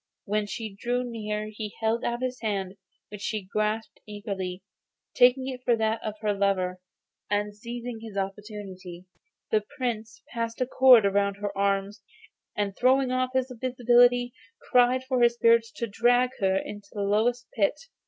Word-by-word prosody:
When 210 +1 -1
she 220 0 -5
drew 245 +5 -1
near 215 -3 -4
he 210 -1 -6
held 225 +1 0
out 240 +1 -2
his 255 0 -3
hand, 195 -4 -2 0.4
which 210 -1 -9
she 215 -1 -2
grasped 215 +3 -2
eagerly, 195 -3 -5 0.5
taking 250 +1 +4
it 255 -1 -5
for 240 -2 +3
that 220 0 0
of 215 -1 -4
her 210 -1 +1
lover; 190 -2 0 0.5
and, 205 0 -1
seizing 235 +1 -6
his 220 -3 -8
opportunity, 195 -3 -6 0.5
the 215 - +3 0.2
Prince 225 -4 -3
passed 230 -1 -3
a 255 - +2
cord 250 -3 +6
round 200 0 +1
her 205 0 -4
arms, 200 +1 0 0.6
and 200 -2 -1
throwing 260 +1 +3
off 255 0 0
his 260 0 0
invisibility 245 0 +3 0.4
cried 250 +1 +4
to 260 -1 +1
his 235 0 +4
spirits 230 -1 +4
to 235 - -3
drag 245 +4 +2
her 190 -2 +2
into 205 +1 -6
the 205 - -3
lowest 230 +4 +1
pit. 210 +6 +1
220 Hz, 160 wpm, -27 LUFS, 200-245 Hz, 0.6 s, cord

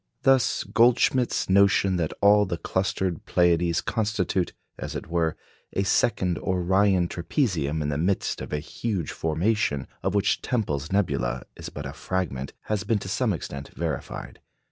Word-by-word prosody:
Thus 130 -3 +3
Goldschmidt's 120 +2 +3
notion 95 -1 +4
that 80 -3 -1
all 105 0 +6
the 85 -2 -2
clustered 95 -1 -1
Pleiades 85 -1 +3
constitute, 105 -5 -1 0.3
as - - -5
it - - -4
were, 85 -2 0 0.4
a 95 - +1
second 95 -3 +1
Orion 95 0 +2
trapezium 85 - -1
in 75 - -1
the 70 0 -1
midst 95 +4 0
of - - -7
a 75 - 0
huge 90 +3 -3
formation 80 -2 0 0.2
of 95 +1 -1
which 100 0 +2
Tempel's 80 - -2
nebula 65 -11 0
is - - -7
but 70 - -7
a 70 - -5
fragment, 75 -6 -3
has 105 -2 -2
been 110 +1 +1
to 100 - -6
some 115 +3 +1
extent 70 -5 -5
verified. - - -4
95 Hz, 150 wpm, -26 LUFS, 80-105 Hz, 0.4 s, all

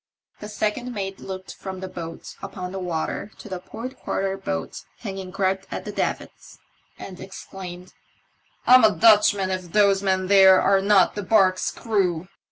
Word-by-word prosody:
The 210 - -8
second 215 +4 -2
mate 195 -1 -4
looked 190 0 -7
from 190 -1 -7
the 190 - -5
boat 165 -2 -8
upon 180 -1 -6
the 190 - -5
water 175 +2 -3
to - - -11
the 185 -3 -5
port 230 +8 -8
quarter 195 0 -2
boat 80 - -5 0.2
hanging 190 -1 -6
griped 190 0 -1
at - - -6
the - - -5
davits, - - -4 0.4
and 185 -2 -9
exclaimed, 185 -1 -9 0.4
" - - -39
I'm 255 0 +7
a 215 -3 +5
Dutchman 205 0 +4
if 185 -2 -5
those 200 -2 +4
men 190 -1 +1
there 190 -1 +7
are 195 0 +3
not 200 -1 +4
the 205 - -4
barque's 190 -2 +3
crew 185 -6 -1
190 Hz, 170 wpm, -23 LUFS, 185-205 Hz, 0.4 s, I'm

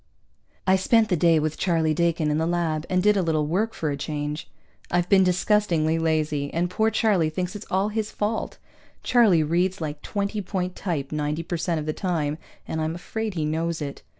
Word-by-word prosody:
I 190 0 +4
spent 220 +3 +3
the 180 - +3
day 165 0 +4
with 155 0 -1
Charlie 165 -4 +2
Dakin 165 -1 +1
in 150 - +1
the 160 - 0
lab, 165 -2 -1
and 185 -1 +1
did 210 0 +5
a 195 - +2
little 160 -3 +1
work 200 +9 -1
for 155 -2 -2
a - - -1
change. 150 +1 -4 0.4
I've 175 0 +1
been 195 -2 +6
disgustingly 180 -4 +2
lazy, 155 -3 0
and 175 +2 -1
poor 220 +4 +2
Charlie 205 -7 +2
thinks 180 +5 -3
it's 210 - -8
all 190 +3 +1
his 215 0 -2
fault. 210 +2 -2 0.5
Charlie 215 -10 +4
reads 180 +5 0
like 150 -2 -5
twenty 205 0 -2
point 185 -1 -3
type 155 -8 -3
ninety 150 +1 -2
per 175 - -3
cent 165 0 -1
of 150 - -5
the 155 - -1
time, 160 -5 -2 0.3
and 160 - -2
I'm 160 +1 -1
afraid 215 +3 -4
he 155 -2 -1
knows 160 +2 -1
it. 145 -2 -5
170 Hz, 205 wpm, -25 LUFS, 155-190 Hz, 0.5 s, been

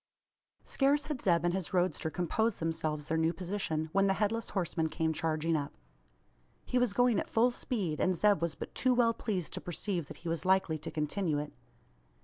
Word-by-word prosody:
Scarce 285 +2 +2
had 300 -5 -4
Zeb 170 -4 +2
and 175 - +2
his 190 -1 -3
roadster 180 -2 +1
composed 195 +7 0
themselves 160 -2 -2
their 160 +1 0
new 160 +1 +2
position, 175 -4 -2
when 195 +1 +4
the 195 - +2
Headless 220 +2 -1
Horseman 170 -4 -1
came 160 +1 0
charging 160 +1 0
up. 145 -2 -3 0.9
He 250 - +1
was 245 -4 +1
going 245 -2 +3
at - - -4
full 240 +2 +3
speed; 195 -11 -2
and 185 -1 +2
Zeb 205 -2 +3
was 170 -1 -1
but - - -7
too 255 -1 +2
well 235 -1 +4
pleased 195 -7 -3
to - - -5
perceive 175 -2 -3
that 155 - -9
he - - -2
was 165 -1 -2
likely 185 -4 +2
to - - -6
continue 155 +1 -1
it. 150 0 -4
180 Hz, 195 wpm, -32 LUFS, 160-210 Hz, 0.9 s, when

